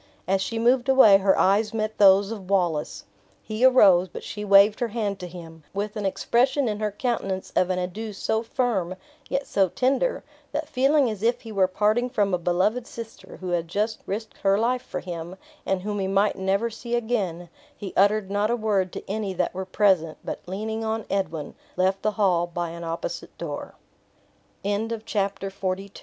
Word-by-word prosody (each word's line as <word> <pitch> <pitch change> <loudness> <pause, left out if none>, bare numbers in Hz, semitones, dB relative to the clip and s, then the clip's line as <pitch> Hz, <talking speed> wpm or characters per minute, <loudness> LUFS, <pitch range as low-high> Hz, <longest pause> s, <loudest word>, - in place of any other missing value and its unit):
As 190 +1 +2
she 230 +4 -3
moved 245 +3 +2
away 260 -7 +8
her 195 0 +3
eyes 210 +3 +2
met 215 0 -2
those 195 +1 +6
of 195 -4 -7
Wallace. 175 -6 0 0.4
He 215 +2 -3
arose; 200 -9 +6
but - - -9
she 210 - -6
waved 200 +1 +6
her 240 - 0
hand 210 -3 -3
to 180 - -6
him, 165 -2 -11
with 205 +2 -3
an 210 -2 -1
expression 255 +7 +1
in 210 -1 -2
her 215 -1 0
countenance 200 -4 -3
of 185 - +3
an 185 - 0
adieu 185 +5 -4
so 220 +2 -1
firm, 225 -7 -1 0.3
yet 275 0 -1
so 195 -2 +2
tender, 270 - 0 0.3
that - - -2
feeling 275 +1 +3
as 215 -4 -4
if 235 +2 +1
he 225 - -9
were 195 -3 +3
parting 215 +6 +1
from 205 -6 0
a 180 - +1
beloved 190 +8 0
sister, 230 -1 -10
who 185 - -4
had 175 -1 -1
just 210 +5 -1
risked 215 +2 -5
her 195 0 +3
life 245 +3 +1
for 185 -8 -6
him, 175 0 -6 0.3
and 190 -1 0
whom 205 0 -3
he 190 - -1
might 195 +2 +2
never 195 +4 0
see 235 +2 -4
again, 205 -8 -2 0.3
he 195 -3 -7
uttered 200 0 +3
not 205 +1 +1
a 240 - +2
word 205 -5 0
to - - -7
any 205 -1 -2
that 180 - -1
were 190 +1 -4
present, 185 -5 +2
but - - -4
leaning 220 +4 -3
on 220 0 -2
Edwin, 165 -6 -2 0.2
left 190 +1 +1
the 215 0 0
hall 180 -5 +2
by 175 0 -3
an 170 0 -8
opposite 165 +1 -5
door. 150 -4 -6 0.9
Chapter 200 - 0
XLIII. 210 +2 -1
The 225 -1 -4
Carse 200 -2 -2
of 195 -1 -4 0.3
Stirling. 200 0 -11
200 Hz, 200 wpm, -25 LUFS, 185-225 Hz, 0.9 s, away